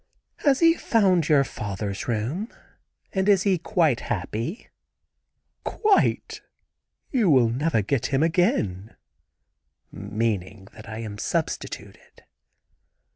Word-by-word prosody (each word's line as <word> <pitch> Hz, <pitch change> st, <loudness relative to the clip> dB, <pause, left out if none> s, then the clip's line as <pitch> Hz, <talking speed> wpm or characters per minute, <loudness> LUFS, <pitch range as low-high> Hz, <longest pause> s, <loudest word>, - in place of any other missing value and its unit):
"Has 280 Hz, -1 st, +2 dB
he 330 Hz, 0 st, +7 dB
found 190 Hz, -, +2 dB
your 145 Hz, -3 st, +5 dB
father's 100 Hz, -5 st, -5 dB
room? 125 Hz, -, -2 dB, 0.6 s
and 190 Hz, +1 st, +1 dB
is 195 Hz, -2 st, +4 dB
he 190 Hz, -4 st, +2 dB
quite 160 Hz, -, +1 dB
happy?" 115 Hz, -, -4 dB, 1.0 s
"Quite. 420 Hz, -3 st, +1 dB, 0.7 s
You 235 Hz, -, +2 dB
will 130 Hz, -6 st, +5 dB
never 125 Hz, -2 st, 0 dB
get 130 Hz, +4 st, 0 dB
him 140 Hz, +2 st, +1 dB
again," 110 Hz, -, 0 dB, 1.0 s
meaning 100 Hz, -2 st, -3 dB
that 110 Hz, 0 st, -12 dB
I 110 Hz, -, -6 dB
am 105 Hz, -2 st, -7 dB
substituted. -, -, -4 dB
135 Hz, 105 wpm, -25 LUFS, -, 1.0 s, he